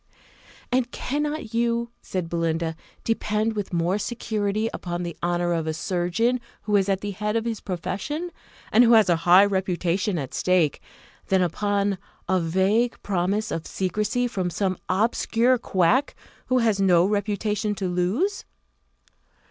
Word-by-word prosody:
"And 250 -1 +1
cannot 295 -4 -3
you," 235 0 0
said 180 -3 -3
Belinda, 165 -1 -1 0.3
"depend 220 -1 0
with 205 -2 -3
more 175 +3 +1
security 215 -1 -1
upon 175 0 -4
the 170 -2 -5
honour 175 0 0
of 165 -1 -1
a 160 - -1
surgeon 180 +9 0 0.2
who 210 -1 0
is 200 -1 +3
at 195 -1 +1
the 205 - -3
head 210 +2 -2
of 230 0 0
his 230 -2 -2
profession, 205 - -4 0.4
and 235 - +6
who 235 0 +5
has 220 -4 +6
a 175 - +5
high 185 +3 +9
reputation 190 -1 0
at 135 -5 -5
stake, 180 -5 +1 0.5
than 190 -1 +3
upon 200 +2 0 0.3
a 185 0 +2
vague 190 +8 +1
promise 200 +3 0
of 165 - -3
secrecy 210 +6 -1
from 190 -7 -2
some 185 +2 -1
obscure 230 +5 +2
quack, 220 +7 +2 0.3
who 255 - +2
has 220 -5 +2
no 180 -2 +5
reputation 210 +1 -1
to 195 -2 -2
lose?" 195 - 0
200 Hz, 150 wpm, -24 LUFS, 180-225 Hz, 0.5 s, high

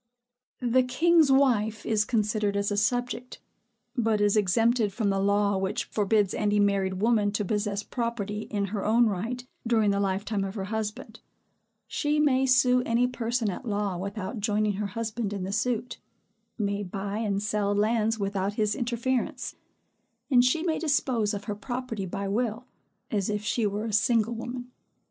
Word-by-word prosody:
The 250 +1 +4
king's 310 +4 +4
wife 225 -6 +2
is 210 -2 +2
considered 210 -2 0
as 200 0 0
a - - 0
subject; 245 +4 -1 0.6
but 225 -4 +1
is 205 0 +3
exempted 220 +2 +2
from 205 -1 0
the 195 - 0
law 200 0 +2
which 195 +5 -1
forbids 205 -2 +1
any 210 -1 +1
married 195 -2 +2
woman 210 0 +2
to 210 -1 -1
possess 205 0 -1
property 215 -4 -3
in 205 -1 -1
her 205 - -2
own 230 +3 +4
right 225 +5 -2 0.2
during 220 -3 +3
the 200 - 0
lifetime 200 +1 -1
of 195 +1 -5
her 195 - -3
husband; 220 +1 -4 0.7
she 300 +1 0
may 265 -3 +3
sue 255 -1 +4
any 240 0 +2
person 235 -3 -1
at 180 - -7
law 205 -4 -1
without 200 +4 -4
joining 210 0 +1
her 205 +1 -2
husband 220 0 -3
in 195 -2 -4
the 190 +2 -3
suit; 240 +1 -1 0.6
may 200 -2 -1
buy 200 +2 -4
and 205 -2 -1
sell 210 -1 0
lands 220 +1 +1
without 200 -1 -1
his 210 -1 +1
interference; 240 +1 -2 0.8
and 245 -2 +6
she 285 +6 +2
may 325 -3 0
dispose 260 -8 +1
of 200 - -6
her 210 - -3
property 225 -2 -4
by 195 +3 -4
will, 225 +3 -1 0.5
as 205 -3 0
if 210 0 -2
she 215 +1 +1
were 205 +2 -3
a 220 - -4
single 225 +1 +2
woman. 245 +2 -6
215 Hz, 165 wpm, -27 LUFS, 205-240 Hz, 0.8 s, and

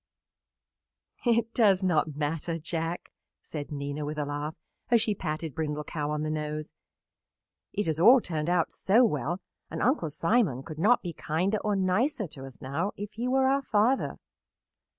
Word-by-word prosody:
"It 230 -1 +2
does 200 -5 +4
not 160 -4 +1
matter, 160 +3 -2
Jack," 165 +1 -4 0.3
said 150 -2 -7
Nina, 145 +1 -3
with 150 +1 -4
a 150 - -1
laugh, 145 +2 -4 0.3
as 235 -1 +5
she 215 -1 +1
patted 155 -4 -4
Brindle 150 0 -2
Cow 150 -1 -3
on 150 0 -1
the 155 - -1
nose. 150 0 -4 1.0
"It 205 0 -1
has 160 -1 -1
all 245 +9 +8
turned 160 -6 -3
out 175 -2 +2
so 225 +6 +4
well 170 - -1 0.3
and - - -5
Uncle 245 - +2
Simon 165 - +1
could 155 0 -8
not 225 +8 +4
be 175 -2 -4
kinder 180 +8 0
or 210 0 0
nicer 210 +7 +1
to 135 -2 -10
us 135 - -13
now 160 +10 -2
if 205 +1 -6
he 235 +3 -3
were 265 +1 +3
our 275 +1 +3
father. 235 +2 +1
165 Hz, 170 wpm, -28 LUFS, 150-210 Hz, 1.0 s, all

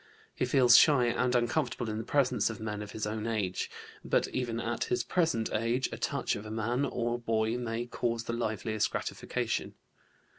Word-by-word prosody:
He - - 0
feels 125 -2 +7
shy 140 -6 +5
and 125 +1 +1
uncomfortable 120 0 0
in 110 0 -3
the - - -3
presence 140 -3 +2
of 115 - -6
men 105 -1 -4
of 105 - -7
his 105 0 -4
own 110 +1 -3
age. 105 -5 -1 0.3
But - - +1
even 120 -3 -2
at 115 0 -2
his 125 - 0
present 160 -11 0
age, 115 +4 0
a - - -5
touch - - -1
of 105 - -6
a 110 - -8
man 115 +5 0
or 120 -2 -1
boy 115 -1 0
may 115 0 -3
cause 120 -1 -2
the 115 - -4
liveliest 110 -2 -1
gratification. - - -3
115 Hz, 185 wpm, -30 LUFS, 110-125 Hz, 0.3 s, feels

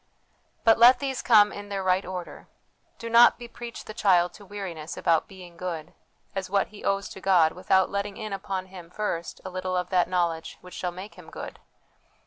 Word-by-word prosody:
But 225 0 +5
let 245 +2 +8
these 265 0 -3
come 210 -3 +6
in 205 0 -8
their 195 -1 -3
right 185 +1 +2
order. 180 -1 -7 0.5
Do 230 - -7
not 230 +1 +7
bepreach 235 0 -9
the 215 - -8
child 180 -4 +3
to 205 - -13
weariness 185 -6 -7
about 165 -2 +2
'being 180 -3 -13
good' 170 -2 -5 0.4
as 190 -1 -4
what 200 0 +1
he 210 - -13
owes 195 0 0
to 190 - -10
God, 175 -5 +4
without 190 +1 +2
letting 200 0 -3
in 215 -3 -5
upon 195 -1 -4
him 185 -3 -12
first 180 -3 -4
a 185 - -5
little 185 0 -2
of 180 +1 -3
that 180 -1 +3
knowledge 170 -3 -1
which 180 - -13
shall 180 - -3
make 185 +4 -10
him - - -13
good. - - -8
190 Hz, 195 wpm, -26 LUFS, 180-205 Hz, 0.5 s, let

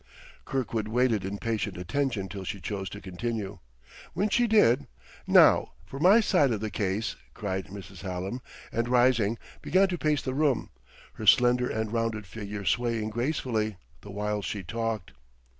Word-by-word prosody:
Kirkwood 115 -5 -2
waited 115 -3 +2
in 100 +2 -3
patient 110 -3 -2
attention 105 +2 -1
till 95 0 -7
she 100 +2 -4
chose 95 +2 -4
to 100 - -8
continue. 100 +1 -4 0.5
When 200 +5 0
she 240 +3 +3
did 145 - +4 0.4
"Now - - +6
for 135 +10 -8
my 195 +8 +7
side 180 -10 +3
of 110 -4 -1
the 110 0 -3
case!" 100 +2 -1 0.2
cried 95 -3 -3
Mrs. 95 -2 -10
Hallam; 95 +6 -4 0.3
and 115 +1 -1
rising, 120 -3 +3 0.2
began 190 +2 +3
to 175 -2 -3
pace 150 -2 +1
the 130 - -2
room, 140 -4 +1 0.4
her - - -6
slender 125 0 +5
and 110 0 -2
rounded 115 -2 -1
figure 100 +1 -6
swaying 115 -2 0
gracefully, 115 - -1 0.2
the 100 - -12
while 105 +1 -2
she 100 0 -4
talked. 115 -1 -3
110 Hz, 160 wpm, -28 LUFS, 100-125 Hz, 0.5 s, my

